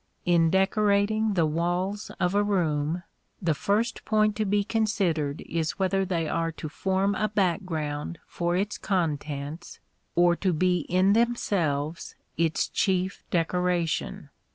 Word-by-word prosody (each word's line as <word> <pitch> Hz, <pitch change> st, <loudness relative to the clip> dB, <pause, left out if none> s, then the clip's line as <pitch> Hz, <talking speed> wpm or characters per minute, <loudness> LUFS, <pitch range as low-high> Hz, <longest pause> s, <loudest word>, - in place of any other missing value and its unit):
In 170 Hz, -2 st, +4 dB
decorating 205 Hz, +3 st, +2 dB
the 170 Hz, -3 st, +3 dB
walls 175 Hz, +6 st, -1 dB
of 180 Hz, +1 st, +1 dB
a 205 Hz, -, +3 dB
room, 170 Hz, -4 st, 0 dB, 0.4 s
the 170 Hz, -5 st, +1 dB
first 210 Hz, +10 st, 0 dB
point 215 Hz, -1 st, +2 dB
to 215 Hz, -, 0 dB
be 205 Hz, +1 st, +2 dB
considered 195 Hz, -10 st, 0 dB
is 165 Hz, +1 st, -2 dB
whether 195 Hz, 0 st, +1 dB
they 170 Hz, -4 st, -1 dB
are 165 Hz, +1 st, -1 dB
to 155 Hz, -1 st, -6 dB
form 190 Hz, +4 st, 0 dB
a 215 Hz, +1 st, 0 dB
background 170 Hz, -6 st, -1 dB
for 175 Hz, 0 st, -2 dB
its 200 Hz, +2 st, -2 dB
contents, 155 Hz, -3 st, -3 dB, 0.4 s
or 175 Hz, 0 st, +5 dB
to 185 Hz, -3 st, +1 dB
be 180 Hz, +2 st, +2 dB
in 185 Hz, +3 st, +4 dB
themselves 175 Hz, -10 st, 0 dB, 0.2 s
its 165 Hz, -1 st, +1 dB
chief 185 Hz, -1 st, 0 dB
decoration. 170 Hz, -, -1 dB
180 Hz, 130 wpm, -27 LUFS, 165-200 Hz, 0.4 s, or